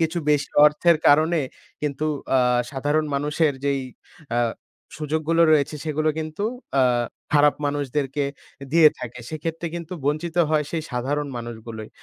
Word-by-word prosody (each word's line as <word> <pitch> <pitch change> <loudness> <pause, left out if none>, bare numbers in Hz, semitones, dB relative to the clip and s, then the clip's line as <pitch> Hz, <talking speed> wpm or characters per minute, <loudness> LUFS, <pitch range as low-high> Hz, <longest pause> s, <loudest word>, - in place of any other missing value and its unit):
কিছু 165 +1 0
বেশি 145 -1 +1 0.2
অর্থের 160 +3 +3
কারণে 160 +3 +4 0.4
কিন্তু 150 0 -1 0.3
আ - - +5 0.3
সাধারণ 145 +3 0
মানুষের 150 +2 +1
যেই 140 -1 +1 0.5
অ্যা 120 0 +1 0.6
সুযোগগুলো 155 +2 0
রয়েছে, 150 0 +2
সেগুলো 155 0 0
কিন্তু 155 +5 -4 0.4
আ - - +5 0.5
খারাপ 145 0 +5
মানুষদেরকে 145 0 -1 0.5
দিয়ে 165 -2 +8
থাকে, 125 0 -7
সেক্ষেত্রে 165 +2 -4
কিন্তু 170 0 -6
বঞ্চিত 155 +4 -1
হয় 155 -1 +2
সেই 165 -2 -2
সাধারণ 140 +4 -1
মানুষগুলোই। 115 -2 -7
150 Hz, 130 wpm, -23 LUFS, 140-160 Hz, 0.6 s, দিয়ে